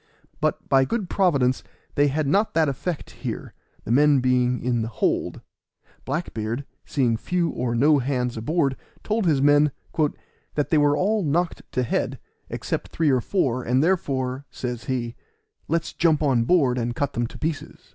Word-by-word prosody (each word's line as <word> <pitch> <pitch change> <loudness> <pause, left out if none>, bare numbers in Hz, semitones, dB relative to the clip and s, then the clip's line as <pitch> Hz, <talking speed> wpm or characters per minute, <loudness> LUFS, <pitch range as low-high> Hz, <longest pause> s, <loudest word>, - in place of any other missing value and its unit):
But, - - -1
by 135 0 +5
good 200 - -2
Providence, 140 -10 +2 0.3
they 145 0 +3
had 150 +2 0
not 200 +9 +1
that 160 -1 +4
effect 145 +4 -3
here, - - -6 0.3
the - - -4
men 145 +2 +5
being 125 -1 +2
in 120 -1 0
the 110 - -2
hold. 110 - -1 0.6
Black 155 +6 -3
beard, 115 +5 -3 0.2
seeing 125 -6 +1
few 170 +8 0
or 120 -1 -2
no 145 +4 +4
hands 125 -2 -1
aboard, 135 +4 0 0.3
told 215 -3 0
his 140 -4 +3
men 145 0 +5 0.8
"that 145 - 0
they 160 - +5
were 145 0 +3
all 210 +3 +1
knocked 170 +2 0
to 125 - +1
head, 120 - -1 0.3
except - - -3
three 160 -3 +1
or 130 -2 +2
four; 130 - 0
and 125 +3 +2
therefore," 135 -6 0
says 120 -2 -5
he, 120 -3 -2 0.5
"let's 165 +1 -1
jump 160 -3 +2
on 125 -5 +2
board 130 -6 +3
and 120 0 -2
cut 145 +2 -1
them 120 -1 -1
to - - -11
pieces." 155 -1 -5
140 Hz, 170 wpm, -24 LUFS, 125-160 Hz, 0.8 s, by